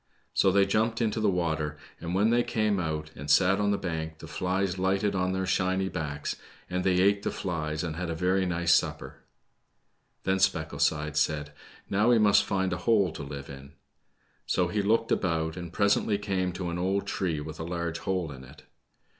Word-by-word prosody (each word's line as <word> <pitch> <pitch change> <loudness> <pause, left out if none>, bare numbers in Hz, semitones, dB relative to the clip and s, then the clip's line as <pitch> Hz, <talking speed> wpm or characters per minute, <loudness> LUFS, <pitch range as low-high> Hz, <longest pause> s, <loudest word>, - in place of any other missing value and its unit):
So 95 - +4
they 100 +1 +4
jumped 110 +3 +1
into 110 -2 0
the 105 -1 +2
water, 80 -4 -1 0.2
and 85 +2 -4
when 105 +4 +3
they 120 +1 +4
came 110 -4 0
out 80 -2 -3
and 75 +1 -8
sat 95 +6 +4
on 100 0 +2
the 100 - +2
bank, 80 -3 -4
the - - -10
flies 95 0 -1
lighted 95 +2 +1
on 90 -1 0
their 95 0 -1
shiny 95 +1 +1
backs, 75 -5 -4 0.3
and 90 0 -1
they 95 -1 +2
eat 100 0 +2
the - - -1
flies 75 -3 -3
and 80 -3 -3
had 90 -1 -3
a 85 - -2
very 90 +2 +1
nice 85 -1 +2
supper. - - 0 1.1
Then 95 0 +1
Specklesides 80 -4 +1
said, 75 -1 0 0.4
Now 105 +4 +2
we 120 - +6
must 100 -2 +5
find 95 -2 0
a - - -2
hole 100 -1 +2
to 75 - -8
hve 70 -1 -7
in." 70 +1 -11 0.7
So 90 -1 +1
he 105 +3 0
looked 115 +3 +1
about, 80 -3 0
and 85 -2 -7
presently 100 +2 +2
came 95 -3 -1
to 90 -1 -4
an 85 - -3
old 95 +2 0
tree 85 -6 -1
with 80 +1 -7
a - - -3
large 85 -1 -3
hole 90 -5 -2
in 65 -1 -10
it. 65 - -15
90 Hz, 195 wpm, -28 LUFS, 80-100 Hz, 1.1 s, we